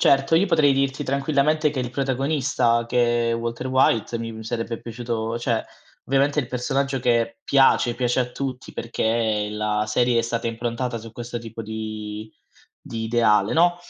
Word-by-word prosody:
Certo, 135 +3 +4
io 190 +5 +3
potrei 155 -6 +4
dirti 135 +1 0
tranquillamente 145 +2 +1
che 135 - -3
il 125 -1 -3
protagonista, 135 -2 +1
che 120 -1 +2
è - - +1
Walter 115 +2 -3
White, 125 -3 +2
mi 115 0 -4
mi 110 0 -9
sarebbe 115 0 -3
piaciuto 115 -1 -3
cioè 120 -2 0 0.4
ovviamente 140 +2 +1
è 150 - +4
il 120 - -9
personaggio 135 +2 -1
che 115 -2 +1
piace, 135 -3 +4
piace 125 +1 +1
a 125 - -1
tutti, 130 0 -5
perché 110 -2 -1
la 105 0 -1
serie 120 +2 +2
è - - -3
stata 115 0 -2
improntata 115 +2 -2
su 115 +1 -10
questo 120 +1 -5
tipo 115 -1 -8
di 110 0 -6 0.5
di 115 -1 -6
ideale, 110 -3 +3
no? 175 +2 +4
120 Hz, 170 wpm, -23 LUFS, 115-135 Hz, 0.5 s, Certo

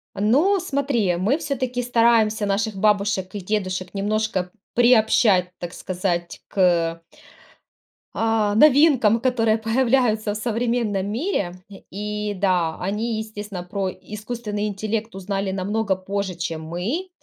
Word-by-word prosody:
Ну, 295 - +3
смотри, 270 - 0
мы 215 - +1
всё-таки 255 -5 -2
стараемся 230 -3 +3
наших 205 +2 0
бабушек 200 -2 +1
и 205 - -4
дедушек 185 -2 -3
немножко 205 -2 -1 0.2
приобщать, 220 -6 +4
так 175 0 -6
сказать, 175 -2 -3
к 170 -3 +1 1.1
а, 225 -2 +1
новинкам, 265 -4 +5
которые 225 -3 +2
появляются 225 -2 +1
в - - -5
современном 230 -3 -1
мире. 230 - -1 0.4
И 210 +1 -3
да, 180 -4 +1
они, 215 +4 -2
естественно, 210 -4 -6
про 190 +1 -3
искусственный 210 0 -5
интеллект 215 +2 -3
узнали 195 0 -3
намного 200 +1 -1
позже, 190 0 -3
чем 165 -2 -4
мы. 195 - -3
210 Hz, 115 wpm, -22 LUFS, 190-230 Hz, 1.1 s, новинкам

